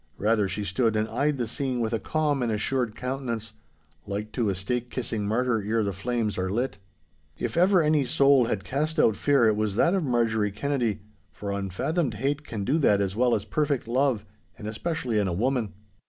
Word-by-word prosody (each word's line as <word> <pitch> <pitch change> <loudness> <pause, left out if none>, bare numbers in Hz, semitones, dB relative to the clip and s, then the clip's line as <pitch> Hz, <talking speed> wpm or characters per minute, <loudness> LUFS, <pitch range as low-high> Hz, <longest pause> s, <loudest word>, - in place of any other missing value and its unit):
Rather, 105 -1 +2
she 95 +2 -3
stood 110 +4 +1
and 110 0 +1
eyed 145 0 0
the 120 - -1
scene 130 +2 -2
with 115 -1 -1
a 115 - +1
calm 150 -1 0
and 120 -2 0
assured 110 +1 -1
countenance, 125 -4 -4 0.5
like 105 +2 -4
to 115 -5 0
a 95 - 0
stake 120 +6 -2
kissing 110 -5 -3
martyr 115 +1 +1
ere 110 +2 +1
the 100 -1 -1
flames 110 +1 -2
are 95 0 -1
lit. 120 +2 -2 0.6
If 120 -2 -3
ever 180 0 +5
any 150 -1 +3
soul 135 0 +4
had 100 -4 -2
cast 150 - -2
out 110 - +4
fear 140 -1 +3
it 110 -1 +4
was 105 -2 -1
that 170 - +3
of 190 -3 +1
Marjorie 115 -5 +1
Kennedy, 120 -3 -1 0.3
for 100 -1 -5
unfathomed 105 - -1
hate 140 +6 -1
can 110 -7 -5
do 145 +10 +1
that 105 -9 +4
as 100 -1 -1
well 125 +1 +3
as 100 - -3
perfect 145 -6 -1
love—and 115 -4 -2
especially 120 0 -1
in 100 - +1
a 90 - -1
woman. 120 +2 0
115 Hz, 200 wpm, -26 LUFS, 105-135 Hz, 0.6 s, ever